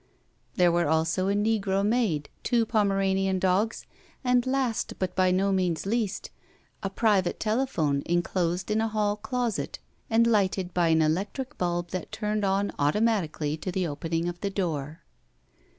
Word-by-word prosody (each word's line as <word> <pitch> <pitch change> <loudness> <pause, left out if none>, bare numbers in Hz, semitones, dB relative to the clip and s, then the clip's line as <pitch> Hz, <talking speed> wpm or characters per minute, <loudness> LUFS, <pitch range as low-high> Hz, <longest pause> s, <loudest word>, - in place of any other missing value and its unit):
There 175 -1 +4
were 170 -1 +2
also 160 +4 +1
a 200 - +1
negro 205 -2 +1
maid, 210 -10 +1
two 235 -2 +2
Pomeranian 195 -3 +1
dogs, 190 +4 0 0.4
and 250 0 +2
last, 260 -4 0
but 185 -1 -3
by 185 -1 +3
no 190 +2 +2
means 180 -4 0
least, 210 -1 -2 0.5
a 195 - -2
private 195 -3 +1
telephone 215 - 0
inclosed 175 +2 0
in 215 +1 +2
a 225 - +1
hall 210 -1 0
closet 225 0 -2 0.3
and 230 0 +4
lighted 190 -5 +1
by 175 -2 +2
an 160 -1 +4
electric 195 - -2
bulb 175 -1 -1
that 185 -3 -5
turned 210 -1 -2
on 195 +1 +1
automatically 160 -2 +1
to 185 +4 -4
the 185 0 -1
opening 165 +2 -2
of 175 0 -4
the 200 - -1
door. 165 -4 -3
195 Hz, 150 wpm, -27 LUFS, 175-215 Hz, 0.5 s, There